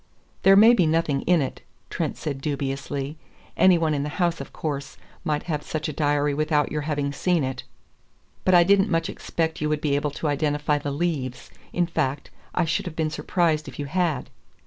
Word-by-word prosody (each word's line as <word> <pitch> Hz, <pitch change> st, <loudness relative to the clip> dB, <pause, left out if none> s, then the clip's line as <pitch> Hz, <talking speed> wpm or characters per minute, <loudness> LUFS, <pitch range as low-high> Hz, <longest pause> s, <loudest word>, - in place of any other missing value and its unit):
"There 195 Hz, 0 st, +7 dB
may 220 Hz, +4 st, +8 dB
be 180 Hz, -9 st, +3 dB
nothing 155 Hz, -3 st, +1 dB
in 175 Hz, -5 st, +4 dB
it," 130 Hz, -, -6 dB, 0.3 s
Trent -, -, -2 dB
said 140 Hz, -3 st, -4 dB
dubiously. 140 Hz, +1 st, -3 dB, 0.4 s
"Any 185 Hz, -2 st, +6 dB
one 160 Hz, -2 st, +1 dB
in 145 Hz, -, 0 dB
the 145 Hz, -, -2 dB
house, 170 Hz, -2 st, +1 dB
of -, -, -9 dB
course, 140 Hz, -3 st, -4 dB, 0.3 s
might 150 Hz, -3 st, -1 dB
have 155 Hz, -4 st, -2 dB
such 155 Hz, +1 st, -4 dB
a 155 Hz, -, -4 dB
diary 145 Hz, -1 st, +1 dB
without 150 Hz, 0 st, +1 dB
your 150 Hz, -, -1 dB
having 145 Hz, -1 st, -1 dB
seen 175 Hz, +1 st, +1 dB
it. 130 Hz, 0 st, -3 dB, 0.8 s
But 185 Hz, -, +4 dB
I 175 Hz, -, +8 dB
didn't 195 Hz, +3 st, +4 dB
much 165 Hz, -1 st, 0 dB
expect 160 Hz, -1 st, -3 dB
you 150 Hz, -, 0 dB
would 150 Hz, -1 st, 0 dB
be 145 Hz, -2 st, 0 dB
able 145 Hz, +1 st, 0 dB
to 145 Hz, +2 st, -4 dB
identify 145 Hz, 0 st, +1 dB
the 145 Hz, -, -4 dB
leaves 140 Hz, -4 st, -3 dB, 0.2 s
in 175 Hz, -, +1 dB
fact, 145 Hz, -4 st, -2 dB, 0.2 s
I -, -, +2 dB
should 165 Hz, -, -1 dB
have 165 Hz, -, -6 dB
been 160 Hz, -1 st, -1 dB
surprised 160 Hz, -1 st, 0 dB
if -, -, -9 dB
you 145 Hz, -, -3 dB
had." 160 Hz, -3 st, -1 dB
150 Hz, 200 wpm, -24 LUFS, 145-165 Hz, 0.8 s, may